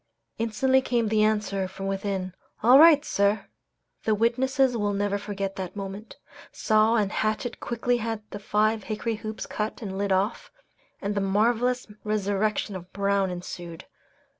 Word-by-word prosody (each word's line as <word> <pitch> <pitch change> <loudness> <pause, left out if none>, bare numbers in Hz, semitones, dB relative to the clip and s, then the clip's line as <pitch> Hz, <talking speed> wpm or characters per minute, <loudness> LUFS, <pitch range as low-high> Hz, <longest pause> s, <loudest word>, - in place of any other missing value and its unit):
Instantly 260 +4 +2
came 235 -4 0
the 215 0 +2
answer 210 -3 +1
from 195 +1 -8
within, 195 -1 -2 0.3
"All 250 +4 +8
right, 305 -2 +7
sir!" 200 +2 +1 0.6
The 220 - +2
witnesses 255 +3 +2
will 205 -2 0
never 200 0 0
forget 195 -1 -4
that 185 -1 -5
moment. 200 +2 -7 0.3
Saw 220 +1 +3
and 210 -3 +1
hatchet 220 +3 -2
quickly 240 +1 0
had 225 -2 -3
the 205 - -6
five 215 +1 +1
hickory 220 +1 -2
hoops 215 0 -6
cut 210 +1 -4
and 200 - -4
the 190 - -5
lid 200 0 -1
off, 195 +4 0 0.5
and 200 +1 -1
the 200 - -1
marvellous 235 +5 +1 0.2
resurrection 210 0 -1
of 180 0 -9
Brown 200 -1 +1
ensued. 175 -2 -7
210 Hz, 155 wpm, -26 LUFS, 195-230 Hz, 0.6 s, All